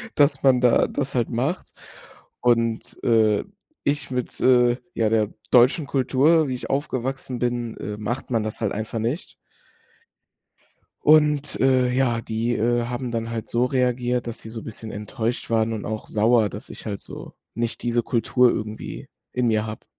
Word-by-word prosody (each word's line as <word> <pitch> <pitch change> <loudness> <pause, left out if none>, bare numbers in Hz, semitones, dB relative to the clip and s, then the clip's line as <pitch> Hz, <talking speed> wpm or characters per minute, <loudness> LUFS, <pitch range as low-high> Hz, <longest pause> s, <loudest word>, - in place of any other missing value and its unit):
dass 140 -1 +3
man 130 -2 +5
da 125 -2 +4
das 140 -2 -3
halt 120 -2 +1
macht 135 +10 -2 0.7
und, 115 -2 +1
äh, 110 -3 +3 0.4
ich 145 -1 0
mit, 125 -1 -3
äh, 125 -1 +5 0.2
ja, 110 -2 +2
der 110 -2 +1 0.2
deutschen 130 +5 +5
Kultur, 140 +4 +3
wie 130 - -2
ich 125 - -7
aufgewachsen 130 -2 -2
bin 120 -1 -2
äh, 105 0 -5
macht 120 +5 -4
man 115 - +2
das 110 - -5
halt 105 -3 0
einfach 110 +2 -4
nicht. 120 +10 -3 1.7
Und, 150 -1 +4
äh, 130 -1 +4
ja, 125 -2 +1
die, 115 +2 -1
äh, 120 +2 +1
haben 125 +1 -4
dann 115 -1 -2
halt 115 -1 -4
so 120 +1 +1
reagiert, 125 -1 0
dass 115 - -5
sie 110 - -10
so 115 0 -6
bisschen 110 0 -8
enttäuscht 110 +4 -3
waren 115 0 +2
und 110 -2 -4
auch 110 0 -4
sauer, 110 0 +3
dass 105 +6 -9
ich - - -10
halt 100 -3 -4
so - - -9 0.2
nicht 115 0 -3
diese 120 0 +1
Kultur 125 +1 +3
irgendwie 105 0 -5 0.2
in 125 -1 0
mir 110 -1 +1
habe. 110 0 -7
120 Hz, 170 wpm, -23 LUFS, 110-130 Hz, 1.7 s, man